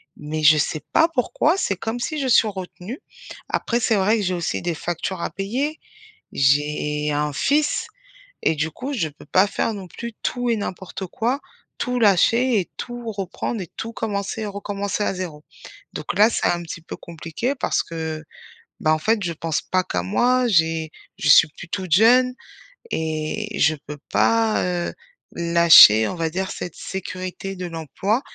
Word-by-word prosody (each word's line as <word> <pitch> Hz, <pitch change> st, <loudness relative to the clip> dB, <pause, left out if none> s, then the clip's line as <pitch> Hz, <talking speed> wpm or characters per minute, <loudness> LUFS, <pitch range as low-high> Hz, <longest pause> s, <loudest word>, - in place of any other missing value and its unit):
Mais 155 Hz, +1 st, -5 dB
je 155 Hz, 0 st, +7 dB
sais 155 Hz, 0 st, -1 dB
pas 325 Hz, -, +5 dB
pourquoi, 315 Hz, +3 st, +1 dB
c'est 200 Hz, -, 0 dB
comme 225 Hz, +5 st, -3 dB
si 305 Hz, +5 st, -3 dB
je 270 Hz, -, -1 dB
suis 235 Hz, -2 st, +5 dB
retenue. 190 Hz, +4 st, -7 dB, 0.5 s
Après, 235 Hz, -, 0 dB
c'est 225 Hz, -1 st, +2 dB
vrai 205 Hz, +3 st, +3 dB
que 210 Hz, -, -1 dB
j'ai 185 Hz, -1 st, 0 dB
aussi 175 Hz, -1 st, -2 dB
des 175 Hz, -1 st, -2 dB
factures 175 Hz, +3 st, -4 dB
à -, -, -3 dB
payer. 255 Hz, +11 st, -2 dB, 0.5 s
J'ai 150 Hz, +2 st, +1 dB
un 150 Hz, 0 st, 0 dB
fils. 290 Hz, -, +1 dB, 0.6 s
Et -, -, +2 dB
du 155 Hz, +1 st, -1 dB
coup, 260 Hz, -, -6 dB
je 190 Hz, -, -1 dB
peux 145 Hz, -, -16 dB
pas 185 Hz, +7 st, +3 dB
faire, 220 Hz, -, -1 dB
non 195 Hz, -3 st, -8 dB
plus, 235 Hz, +7 st, -7 dB
tout 245 Hz, 0 st, -1 dB
et -, -, +3 dB
n'importe 190 Hz, -2 st, -5 dB
quoi, 245 Hz, -, -1 dB, 0.4 s
tout 250 Hz, 0 st, -1 dB
lâcher 230 Hz, +3 st, +4 dB
et 180 Hz, -, -6 dB
tout 240 Hz, -1 st, -6 dB
reprendre 200 Hz, +2 st, -4 dB
et 180 Hz, -, -6 dB
tout 230 Hz, -, -5 dB
commencer 210 Hz, -1 st, -3 dB
et 215 Hz, -, -3 dB
recommencer 200 Hz, 0 st, -3 dB
à -, -, 0 dB
0. 170 Hz, -5 st, -6 dB, 0.5 s
Donc -, -, -4 dB
là, 210 Hz, +3 st, +6 dB
c'est -, -, 0 dB
un 175 Hz, 0 st, +1 dB
petit 170 Hz, 0 st, -8 dB
peu -, -, -8 dB
compliqué 170 Hz, -, -4 dB
parce -, -, 0 dB
que, 160 Hz, -1 st, -5 dB, 0.6 s
bah, 155 Hz, -, +3 dB
en 155 Hz, -, +2 dB
fait, 215 Hz, +6 st, +1 dB
je 170 Hz, -, -1 dB
pense 160 Hz, -1 st, -2 dB
pas 185 Hz, -1 st, 0 dB
qu'à 90 Hz, -1 st, -2 dB
moi, 250 Hz, -, +2 dB
j'ai 160 Hz, -5 st, +2 dB, 0.3 s
je 150 Hz, -, -1 dB
suis 155 Hz, -, +8 dB
plus 170 Hz, -, -9 dB
toute 185 Hz, -4 st, -4 dB
jeune. 250 Hz, +7 st, +5 dB, 0.6 s
Et 160 Hz, +6 st, -2 dB
je 155 Hz, +1 st, +3 dB
peux 150 Hz, +1 st, -6 dB
pas, 225 Hz, -1 st, +3 dB
heu, 175 Hz, -1 st, -2 dB, 0.4 s
lâcher, 170 Hz, -10 st, +7 dB
on -, -, -4 dB
va 165 Hz, -1 st, -1 dB
dire, 190 Hz, +3 st, -3 dB
cette 175 Hz, -, -6 dB
sécurité 185 Hz, +1 st, -6 dB
de 180 Hz, -1 st, -5 dB
l'emploi. 175 Hz, -, -2 dB
185 Hz, 180 wpm, -22 LUFS, 160-225 Hz, 0.6 s, suis